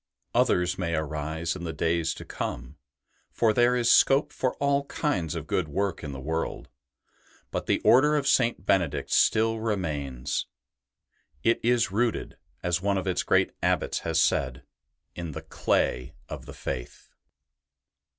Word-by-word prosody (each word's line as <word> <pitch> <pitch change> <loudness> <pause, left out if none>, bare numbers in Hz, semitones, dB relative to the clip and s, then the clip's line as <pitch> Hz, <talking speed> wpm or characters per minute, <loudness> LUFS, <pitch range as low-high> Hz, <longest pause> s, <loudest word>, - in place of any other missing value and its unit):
Others 90 +1 +2
may 85 -2 -1
arise 80 +2 -2
in 90 - -7
the 85 - -3
days 85 0 0
to - - -9
come, 65 +5 -5 0.5
for 110 -2 +2
there 120 +2 +4
is 120 -1 +3
scope 135 +2 +4
for 130 - -1
all 140 0 +1
kinds 95 - -2
of - - -4
good 85 - -1
work 95 +6 -2
in 75 - -5
the 65 - -7
world; 80 +4 -3 0.8
but - - -3
the - - +3
Order 150 +5 +5
of 140 -1 -1
St. 115 -8 +2
Benedict 90 -8 +1
still 115 0 +3
remains: 75 - -2 0.5
'' 70 +1 -42
It 115 - +3
is 120 -3 +2
rooted," 115 +2 -1 0.3
as 90 0 0
one 100 0 +1
of 95 - -2
its 90 -2 0
great - - +2
Abbots - - +1
has 80 -1 0
said, 65 -5 +1 0.3
" - - -54
in 85 -3 -5
the - - -7
clay 65 +5 0
of - - -8
the - - -8
Faith.'' - - -6
90 Hz, 160 wpm, -27 LUFS, 80-115 Hz, 0.8 s, Order